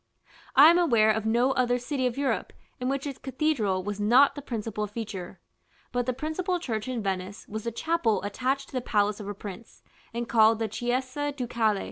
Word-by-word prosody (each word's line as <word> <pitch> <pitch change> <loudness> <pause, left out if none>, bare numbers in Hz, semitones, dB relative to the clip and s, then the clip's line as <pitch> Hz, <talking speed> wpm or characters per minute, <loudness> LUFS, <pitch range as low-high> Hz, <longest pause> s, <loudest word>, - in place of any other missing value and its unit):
I 290 +4 +9
am 345 - +4
aware 230 -10 +4
of 220 0 -1
no 240 +4 +3
other 245 -2 +2
city 255 +1 -1
of 245 - -4
Europe 280 -1 -1 0.3
in 250 0 -1
which 275 +1 -2
its 280 -3 -5
cathedral 260 -9 0
was 205 +1 -4
not 245 +7 +5
the 285 - -7
principal 220 -4 -3
feature. 205 -4 -6 0.5
But 245 0 -1
the - - +2
principal 315 +7 -2
church 225 -9 -3
in 245 -4 -3
Venice 190 +1 -3
was 220 +1 -6
the 235 - -1
chapel 275 -5 0
attached 260 +7 -2
to - - -19
the 255 - -1
palace 210 -2 +1
of 205 - -7
her 205 - -4
prince, 200 +2 -10 0.3
and 235 +1 -4
called 225 -1 +5
the 225 0 -1
"Chiesa 255 +6 -2
Ducale." 235 -6 0
240 Hz, 195 wpm, -27 LUFS, 215-270 Hz, 0.5 s, I